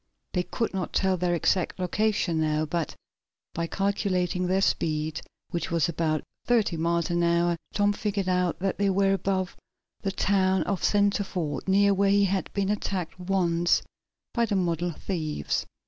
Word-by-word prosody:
They 180 - +2
could 225 +5 -2
not 190 -2 -3
tell 190 -1 +2
their 175 -1 0
exact 175 +2 +1
location 185 -3 +1
now, 155 0 +1
but 165 0 -2 0.6
by 170 0 -2
calculating 185 -2 0
their 190 +1 +2
speed, 155 -4 0 0.3
which 170 - -2
was 165 -3 +2
about 155 -2 -1 0.2
thirty 225 -7 +2
miles 170 +1 0
an 175 0 +1
hour, 170 0 +2 0.2
Tom 205 0 +2
figured 200 -2 -2
out 180 -1 +1
that 195 0 -1
they 200 -1 +3
were 195 0 +3
above 190 -1 -1 0.5
the 195 - -1
town 190 -1 +2
of 200 -3 -2
Centreford, 200 -8 0
near 200 +1 +4
where 195 0 +2
he 200 0 +4
had 190 -3 -1
been 200 -1 -1
attacked 190 -4 -3
once 175 -2 +2 0.5
by 235 -1 +2
the 205 - 0
model 175 -2 0
thieves. 155 - -3
185 Hz, 160 wpm, -27 LUFS, 170-195 Hz, 0.6 s, near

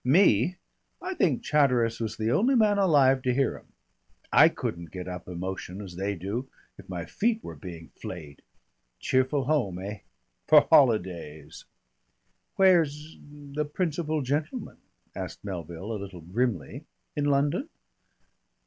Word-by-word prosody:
Me! 145 - +4 0.4
I 375 +1 -4
think 160 - +1
Chatteris 125 -6 +2
was 110 -1 -3
the 110 +1 0
only 250 - +3
man 210 -3 +4
alive 140 -8 +4
to 125 0 +1
hear 135 -2 +1
'em. - - -14 0.7
I - - +8
couldn't 85 -1 -5
get 90 -1 -7
up 90 -1 -7
emotion 90 +1 -5
as 95 -4 -8
they 100 +2 -2
do, 100 +9 -4 0.3
if - - -15
my 85 -3 -4
feet 225 - 0
were - - -7
being 85 -5 -9
flayed. 75 -6 -9 0.6
Cheerful 130 +2 +1
home, 125 -10 0
eh? 100 +3 -6 0.5
For - - +8
holidays." 90 - +2 0.9
"Where's 160 -5 +3
the 145 0 -5
principal 155 -1 -1
gentleman?" 150 - -3 0.4
asked - - -6
Melville 90 +1 -6
a 105 - -4
little 95 -3 -8
grimly. 90 - -2 0.3
"In 145 - 0
London?" 145 - +1
125 Hz, 135 wpm, -27 LUFS, 95-150 Hz, 0.9 s, I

